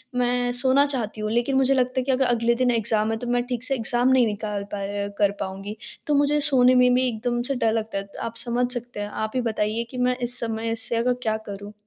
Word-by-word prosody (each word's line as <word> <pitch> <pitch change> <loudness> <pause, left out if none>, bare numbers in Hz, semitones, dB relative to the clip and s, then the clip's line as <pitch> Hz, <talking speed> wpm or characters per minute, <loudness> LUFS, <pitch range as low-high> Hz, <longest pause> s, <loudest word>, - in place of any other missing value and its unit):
मैं 245 0 +1
सोना 260 +3 +3
चाहती 235 -6 -3
हूँ 215 0 -2
लेकिन 240 +4 +1
मुझे 265 0 +4
लगता 255 -1 +1
है - - 0
कि 270 - 0
अगर 265 +1 +2
अगले 235 -1 +2
दिन 250 0 +2
एग्ज़ाम 220 -1 +1
है 225 - -1
तो 245 - -6
मैं 245 0 +1
ठीक 245 -1 -3
से 270 +1 -1
एग्ज़ाम 240 +1 +1
नहीं 260 -2 +5
निकाल 210 -1 -3
पर 200 0 -3
कर 205 -1 +3
पाऊँगी। 195 +3 -5 0.3
तो 300 - +2
मुझे 290 +1 +3
सोने 255 -2 +5
में 250 0 +5
भी 255 +1 +3
एकदम 240 +1 -1
से - - 0
डर 230 -3 +1
लगता 225 -2 -2
है। 195 0 -4 0.2
आप 230 0 -5
समझ 245 +1 0
सकते 245 -3 -6
हैं। 205 0 -3
आप 220 +1 -3
ही 255 - +2
बताइए 215 +2 -1
कि 255 - -7
मैं 250 0 +1
इस 245 -1 -3
समस्या 225 0 -2
का 250 +1 +2
क्या 230 -3 -2
करूँ? 205 +1 -7
240 Hz, 245 wpm, -24 LUFS, 220-250 Hz, 0.3 s, नहीं